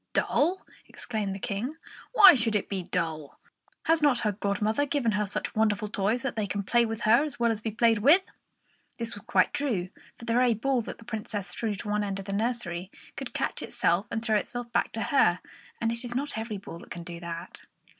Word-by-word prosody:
"Dull!" 350 +6 +1 0.2
exclaimed 210 -4 -4
the - - -6
King. 220 +10 -3 0.4
"Why 400 -7 +10
should 230 -4 +1
it 205 - 0
be 195 -2 -2
dull? 160 -4 -3 0.4
Has 325 0 +3
not 285 -5 +3
her 210 - +1
godmother 210 +7 0
given 270 -6 +1
her 205 0 0
such 200 - -4
wonderful 215 -1 +1
toys 210 +5 0
that 275 - -2
they 215 -2 -1
can 200 +1 -2
play 235 +3 +3
with 225 0 -4
her 235 +5 +5
as 300 -4 -5
well 235 -1 +3
as 220 -1 -3
be 220 - -2
played 225 0 +3
with?" 305 - +6 0.7
This 230 0 +1
was 205 - -8
quite 240 - +3
true, 220 -11 -1 0.3
for 235 - -10
the 230 - 0
very 245 -1 +4
ball 255 +3 +1
that - - -7
the 230 - -15
Princess 215 -4 -4
threw 215 +3 -2
to 205 - -8
the 210 - 0
other 210 0 +1
end 195 -1 -3
of 195 - -6
the 200 - -4
nursery 200 -5 -2 0.3
could - - -7
catch - - -2
itself 180 +6 0
and 225 0 -3
throw 220 -2 +3
itself 240 +3 -4
back 235 - +1
to 225 - -1
her; 185 -11 +3 0.4
and 230 0 0
it 235 +1 -4
is 240 -1 -5
not 280 0 -2
every 220 -1 -4
ball 180 -4 -9
that - - -14
can 170 - -6
do 170 0 -7
that. 170 +1 -7
220 Hz, 225 wpm, -28 LUFS, 200-240 Hz, 0.7 s, Why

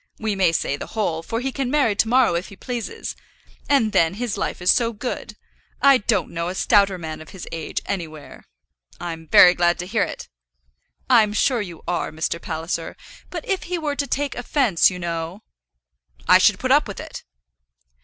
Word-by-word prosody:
We 220 -2 -2
may 185 -3 +3
say 140 -3 -1
the 225 - -9
whole, 165 -7 0
for 225 +7 -4
he 265 +1 -2
can 270 -2 -2
marry 280 -6 +2
to 220 - +2
morrow 245 -4 +4
if 170 +2 -2
he 200 - -12
pleases. 250 - -5 0.5
And 265 -7 +3
then 165 0 +2
his 235 -1 -3
life - - -3
is 180 0 +4
so 235 -1 0
good. 245 +4 -5 0.4
I 275 -2 +6
don't 210 -2 0
know 170 0 -3
a 180 - -4
stouter 195 -1 +3
man 160 -2 -6
of 155 - -12
his 190 -3 -9
age, 165 -2 -4
anywhere." 160 -6 -6 0.5
"I'm 165 -2 -6
very 180 +3 +8
glad 175 -1 +2
to 175 - -5
hear 185 - -1
it." - - -3 0.8
"I'm 220 -5 +4
sure 240 +2 +2
you 175 -5 -8
are, 175 - -1
Mr. 160 +2 -3
Palliser. 165 0 -4 0.3
But - - -6
if 385 -4 -1
he 355 0 -2
were 300 -3 -2
to 280 0 -2
take 285 +3 -1
offence, 245 - +2
you 185 - -6
know?" 170 +2 -4 0.8
"I - - +7
should - - +4
put - - -2
up - - +4
with - - -7
it." - - -8
200 Hz, 195 wpm, -22 LUFS, 170-245 Hz, 0.8 s, very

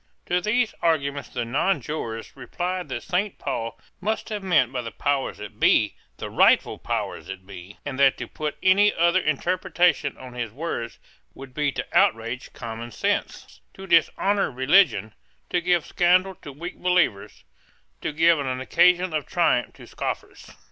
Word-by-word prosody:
To 180 0 0
these 220 +3 +1
arguments 140 -4 0
the 120 -2 -3
nonjurors 130 -4 -2
replied 180 0 -4
that - - -4
Saint 190 +3 -1
Paul 115 -4 -4 0.2
must 220 +3 -2
have 210 -2 -3
meant 160 -10 +2
by 125 -2 -2
the 115 - -6
powers 140 +4 -1
that 105 -1 -10
be - - +4 0.2
the - - -5
rightful - - +4
powers - - -3
that 95 -1 -8
be; 95 0 -11
and 135 -2 -5
that 135 -1 +5
to - - -5
put 155 -1 -4
any 200 +2 +5
other 170 +2 +3
interpretation 175 -1 +1
on 130 -1 -10
his 120 -3 -4
words 135 -3 -5 0.4
would 135 -1 -11
be 145 +1 0
to - - -3
outrage 130 - +1
common 115 0 -7
sense, - - -3
to 190 - -9
dishonour 195 +3 +2
religion, 130 - +3 0.4
to 175 - +1
give 175 -2 +2
scandal 185 +2 +3
to 145 - -8
weak 170 +6 -8
believers, 180 - 0 0.6
to - - -2
give 165 +1 +4
an 130 -2 -2
occasion 180 +6 +3
of 150 -3 -2
triumph 165 -8 +1
to - - -13
scoffers. - - -6
155 Hz, 160 wpm, -24 LUFS, 125-180 Hz, 0.6 s, that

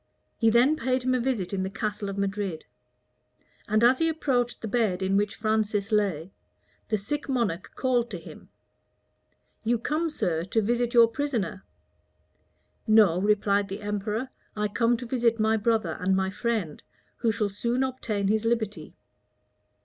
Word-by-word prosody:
He 225 - +3
then 245 +7 +4
paid 255 0 0
him 255 0 +1
a 255 - +2
visit 235 -7 -1
in 190 - -1
the 190 - -2
castle 210 0 -3
of 195 - -5
Madrid; 200 -4 -2 1.0
and 215 +1 +2
as 250 +2 +5
he 325 0 +3
approached 255 -6 0
the 225 - -5
bed 200 -4 0
in 190 +1 +1
which 205 0 +1
Francis 215 -1 0
lay, 195 -5 0 0.6
the 215 - +2
sick 290 +9 -4
monarch 205 -9 -1
called 245 -2 +1
to - - -5
him, - - -13 1.1
"You 235 +2 +2
come, 310 +8 -1
sir, 165 - -1
to 210 +4 0
visit 240 +2 0
your 235 -1 +8
prisoner." 230 -8 -3 1.2
"No," 210 -5 +5
replied 205 -1 +2
the 195 +2 -6
emperor, 210 +4 -3 0.3
"I 210 0 -1
come 235 +3 +2
to 245 - -7
visit 235 -2 +1
my 220 +1 +3
brother 220 -6 0
and 190 +1 +1
my 190 0 0
friend, 210 -7 -2 0.4
who 230 -2 +1
shall 210 -1 -1
soon 235 +6 -1
obtain 230 -6 -2
his 215 +2 +1
liberty." 225 -2 -2
220 Hz, 160 wpm, -27 LUFS, 200-240 Hz, 1.2 s, your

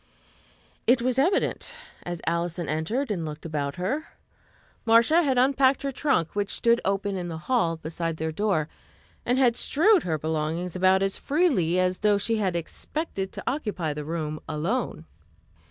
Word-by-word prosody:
It 240 +1 +4
was 255 +1 +1
evident, 365 - +1 0.3
as 175 -1 -6
Alison 170 0 -1
entered 210 - -1
and 180 -5 -2
looked 155 0 -7
about 145 -3 -2
her. 265 - -2 0.8
Marcia 235 +9 +5
had 270 -6 +1
unpacked 265 +1 +3
her 275 - -1
trunk, 265 - 0
which 205 -1 -1
stood 235 0 +2
open 200 0 -1
in 180 -2 -3
the 165 -2 -5
hall 170 -3 0
beside 165 0 -4
their 160 0 -2
door, 165 -3 0 0.6
and 245 - +2
had 250 -3 +4
strewed 350 - +4
her 160 -3 -1
belongings 160 +3 -2
about 190 +1 +4
as 195 0 -1
freely 265 - +2
as 185 0 +1
though 210 -1 +3
she 225 +3 0
had 190 -4 0
expected 195 - -4
to - - -7
occupy 210 - -2
the 150 0 -5
room 155 -1 -3
alone. 160 - -2
190 Hz, 160 wpm, -26 LUFS, 165-250 Hz, 0.8 s, Marcia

